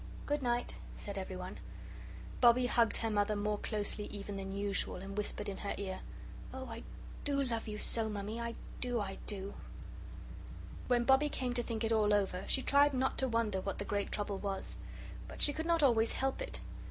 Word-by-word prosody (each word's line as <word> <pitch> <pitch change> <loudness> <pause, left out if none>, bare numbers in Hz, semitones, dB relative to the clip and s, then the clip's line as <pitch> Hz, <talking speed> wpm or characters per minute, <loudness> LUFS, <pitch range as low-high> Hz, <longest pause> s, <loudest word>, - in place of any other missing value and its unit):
"Good 290 0 0
night," 240 -1 0 0.2
said 200 - -5
everyone. 185 -1 -5 0.8
Bobbie 245 +1 +7
hugged 235 -2 +3
her 225 -1 0
mother 205 0 +2
more 210 0 0
closely 210 -1 +1
even 205 -1 -6
than 195 0 -4
usual, 200 0 -1
and 195 +2 -6
whispered 210 0 -1
in 200 - -3
her 200 - -3
ear, 190 -2 -3 0.5
"Oh, 260 0 -5
I - - -6 0.4
do 285 -1 +1
love 230 -4 -2
you 210 -1 -4
so, 220 +1 +4
Mummy 210 +2 -3
I 235 0 -3 0.2
do 245 -2 0
I 195 -2 -4
do 200 -1 -4 0.6
" - - -12
When 245 -1 +4
Bobbie 265 +4 +5
came 255 -3 -1
to 245 - +2
think 230 -1 -3
it 225 - +1
all 210 -2 +4
over, 190 -2 0
she 265 - +2
tried 285 0 +5
not 260 +1 +1
to 265 - +3
wonder 225 -5 +1
what 195 - -3
the 200 - -3
great 205 0 -1
trouble 205 -2 -2
was. 195 -1 -3 0.5
But - - -9
she 290 - +5
could 320 +2 -3
not 335 -2 +3
always 230 -4 +4
help 270 - 0
it. - - -3
220 Hz, 195 wpm, -34 LUFS, 200-250 Hz, 0.8 s, Bobbie